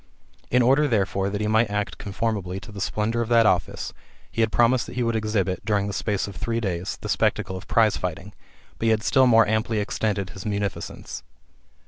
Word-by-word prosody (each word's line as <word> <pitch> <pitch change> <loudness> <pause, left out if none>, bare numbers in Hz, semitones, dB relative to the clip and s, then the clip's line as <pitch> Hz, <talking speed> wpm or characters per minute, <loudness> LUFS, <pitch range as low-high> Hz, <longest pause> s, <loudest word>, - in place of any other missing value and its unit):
In 125 0 +4
order, 135 +5 +4
therefore, 100 - 0
that 100 +1 -3
he 105 - 0
might 110 +1 +3
act 105 -1 -3
conformably 100 -2 -2
to - - -11
the 100 -1 -7
splendour 110 +4 -1
of 115 - -3
that 115 -1 +5
office, 90 -4 0 0.4
he 115 - -1
had 110 -1 +2
promised 120 +1 +3
that - - -9
he 125 - 0
would 115 -1 0
exhibit, 105 -4 -1
during 100 -1 +1
the 100 - -3
space 100 0 -1
of 100 - -8
three 115 +4 -2
days, 95 -3 -3
the - - -5
spectacle 95 - 0
of 95 +1 -8
prize 110 -2 +3
fighting; 95 +3 -5 0.5
but - - -1
he - - +4
had 110 -1 +2
still 130 0 +4
more 115 -2 +6
amply 110 +1 0
extended 100 -2 -1
his 95 +2 -9
munificence. 100 -3 -4
105 Hz, 205 wpm, -24 LUFS, 100-115 Hz, 0.5 s, more